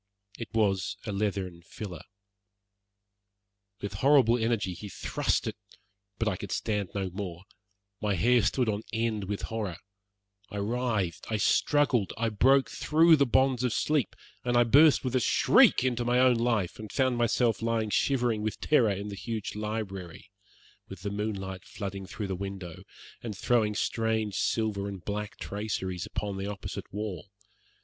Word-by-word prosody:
It 115 Hz, -, -6 dB
was 100 Hz, -4 st, +1 dB
a 105 Hz, -, -3 dB
leathern 100 Hz, -4 st, -2 dB
filler. 90 Hz, 0 st, -8 dB, 1.8 s
With 100 Hz, -1 st, -4 dB
horrible 130 Hz, +1 st, +5 dB
energy 110 Hz, -5 st, 0 dB
he 100 Hz, +4 st, -8 dB
thrust -, -, -1 dB
it -, -, -3 dB, 0.6 s
but 115 Hz, -, -1 dB
I 95 Hz, -4 st, 0 dB
could 100 Hz, -, -7 dB
stand 105 Hz, -4 st, -1 dB
no 95 Hz, -2 st, -2 dB
more. 90 Hz, -2 st, -6 dB, 0.6 s
My 105 Hz, -2 st, +1 dB
hair 120 Hz, +6 st, +4 dB
stood 120 Hz, +4 st, +1 dB
on 105 Hz, -1 st, 0 dB
end 110 Hz, -2 st, -1 dB
with 100 Hz, +1 st, -4 dB
horror. 105 Hz, -6 st, -3 dB, 0.7 s
I 105 Hz, -, -6 dB
writhed, 105 Hz, -5 st, -1 dB
I 110 Hz, -, +1 dB
struggled, 130 Hz, -1 st, +2 dB
I 115 Hz, 0 st, +1 dB
broke 130 Hz, +6 st, +3 dB
through 160 Hz, +2 st, +5 dB
the 140 Hz, -1 st, +3 dB
bonds 130 Hz, 0 st, +2 dB
of 125 Hz, -3 st, +1 dB
sleep, 150 Hz, -4 st, 0 dB, 0.3 s
and 120 Hz, -1 st, +1 dB
I 120 Hz, -, +6 dB
burst 145 Hz, +6 st, +6 dB
with 130 Hz, -1 st, -2 dB
a -, -, +4 dB
shriek 125 Hz, -, +5 dB
into 125 Hz, -2 st, 0 dB
my 120 Hz, +1 st, +2 dB
own 125 Hz, -1 st, +5 dB
life, 115 Hz, -6 st, 0 dB
and 110 Hz, -1 st, -8 dB
found 130 Hz, -3 st, +1 dB
myself 120 Hz, -1 st, +2 dB
lying 115 Hz, -2 st, 0 dB
shivering 120 Hz, -5 st, +1 dB
with 110 Hz, 0 st, -3 dB
terror 125 Hz, -8 st, +3 dB
in 100 Hz, +1 st, -3 dB
the 100 Hz, -, -6 dB
huge 110 Hz, 0 st, -4 dB
library, 105 Hz, -5 st, -5 dB, 0.6 s
with -, -, -9 dB
the 100 Hz, -, -2 dB
moonlight 100 Hz, -3 st, -4 dB
flooding 100 Hz, -2 st, -6 dB
through 105 Hz, +1 st, -5 dB
the 95 Hz, -, -1 dB
window 95 Hz, -3 st, -7 dB, 0.4 s
and 110 Hz, -5 st, -6 dB
throwing 110 Hz, -3 st, +2 dB
strange 110 Hz, -2 st, 0 dB
silver 105 Hz, -1 st, 0 dB
and 100 Hz, -3 st, -7 dB
black 105 Hz, 0 st, -4 dB
traceries 95 Hz, -4 st, -4 dB
upon 100 Hz, -2 st, -4 dB
the 95 Hz, +1 st, -3 dB
opposite 100 Hz, -2 st, -6 dB
wall. 100 Hz, -3 st, -5 dB
105 Hz, 160 wpm, -29 LUFS, 100-120 Hz, 1.8 s, I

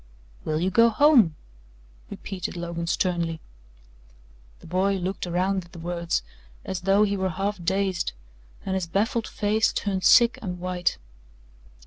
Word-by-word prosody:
"Will 155 Hz, 0 st, -1 dB
you 185 Hz, +3 st, 0 dB
go 230 Hz, +4 st, +5 dB
home?" 235 Hz, -, +5 dB, 0.7 s
repeated 180 Hz, -2 st, -6 dB
Logan 170 Hz, 0 st, -4 dB
sternly. 170 Hz, -2 st, -1 dB, 1.2 s
The -, -, -16 dB
boy 190 Hz, +4 st, +1 dB
looked 185 Hz, 0 st, -3 dB
around 185 Hz, +2 st, 0 dB
at 170 Hz, -, -20 dB
the -, -, -10 dB
words, 170 Hz, -, -2 dB, 0.4 s
as 190 Hz, -1 st, -4 dB
though 195 Hz, +3 st, +4 dB
he 200 Hz, -1 st, +1 dB
were 190 Hz, -1 st, -1 dB
half 195 Hz, +1 st, -3 dB
dazed, 190 Hz, 0 st, 0 dB, 0.5 s
and 190 Hz, -, -2 dB
his 190 Hz, -2 st, -1 dB
baffled 220 Hz, +6 st, 0 dB
face 215 Hz, +1 st, +1 dB
turned 190 Hz, -2 st, -2 dB
sick 235 Hz, -1 st, +6 dB
and 180 Hz, -4 st, -4 dB
white. 180 Hz, -1 st, -1 dB
185 Hz, 140 wpm, -25 LUFS, 175-200 Hz, 1.2 s, sick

